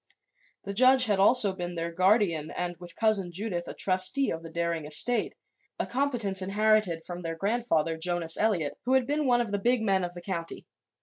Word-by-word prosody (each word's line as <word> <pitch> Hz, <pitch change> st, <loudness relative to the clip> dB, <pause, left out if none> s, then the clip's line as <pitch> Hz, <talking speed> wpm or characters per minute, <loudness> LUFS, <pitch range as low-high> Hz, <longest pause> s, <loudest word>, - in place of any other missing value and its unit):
The 200 Hz, -, -5 dB
judge 255 Hz, +4 st, +4 dB
had 205 Hz, -4 st, 0 dB
also 205 Hz, -1 st, +5 dB
been 175 Hz, -1 st, -6 dB
their 170 Hz, 0 st, -3 dB
guardian 185 Hz, -3 st, +2 dB
and, 175 Hz, 0 st, -4 dB
with 175 Hz, -1 st, -9 dB
Cousin 215 Hz, -5 st, 0 dB
Judith, 175 Hz, -2 st, -4 dB
a -, -, -7 dB
trustee 190 Hz, +9 st, +1 dB
of 165 Hz, -, -4 dB
the 165 Hz, -, -10 dB
Daring 170 Hz, -1 st, -2 dB
estate 195 Hz, +11 st, 0 dB, 0.4 s
a -, -, 0 dB
competence 240 Hz, -8 st, -1 dB
inherited 200 Hz, -3 st, +1 dB
from 175 Hz, 0 st, -7 dB
their 165 Hz, -1 st, -4 dB
grandfather, 165 Hz, -6 st, -1 dB
Jonas 170 Hz, -1 st, +2 dB
Eliot, 185 Hz, -9 st, -1 dB
who 255 Hz, -, +1 dB
had 260 Hz, -2 st, +2 dB
been 295 Hz, +1 st, -1 dB
one 240 Hz, -1 st, +3 dB
of 230 Hz, -4 st, -4 dB
the 205 Hz, -, -1 dB
big 240 Hz, +2 st, +1 dB
men 195 Hz, -3 st, +1 dB
of 175 Hz, 0 st, -5 dB
the 175 Hz, -, -8 dB
county. 170 Hz, -4 st, -5 dB
190 Hz, 195 wpm, -27 LUFS, 170-225 Hz, 0.4 s, also